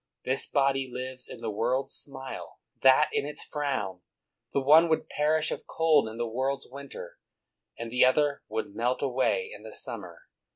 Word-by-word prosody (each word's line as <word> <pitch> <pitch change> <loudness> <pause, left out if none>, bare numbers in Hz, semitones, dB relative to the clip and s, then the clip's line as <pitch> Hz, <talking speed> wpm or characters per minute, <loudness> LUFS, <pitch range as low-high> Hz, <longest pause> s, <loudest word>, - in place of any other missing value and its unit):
This 130 +1 +1
body 135 -1 +2
lives 130 0 -5
in - - -9
the 115 -2 -2
world's 125 +6 -1
smile, 135 -2 -7 0.2
that 135 +3 +6
in - - +1
its 150 +1 -5
frown; 130 - -2 0.5
the - - +1
one 155 +5 +6
would 160 - +1
perish 155 +1 +1
of - - -5
cold 155 -7 +3
in 110 - -9
the 120 - -1
world's 130 +4 -2
winter, 140 +1 -9 0.6
and 115 0 -6
the 125 - +4
other 140 +2 +3
would 110 -2 -4
melt 120 +5 0
away 140 - +1
in - - -12
the - - -9
summer. - - -3
135 Hz, 170 wpm, -28 LUFS, 125-145 Hz, 0.6 s, that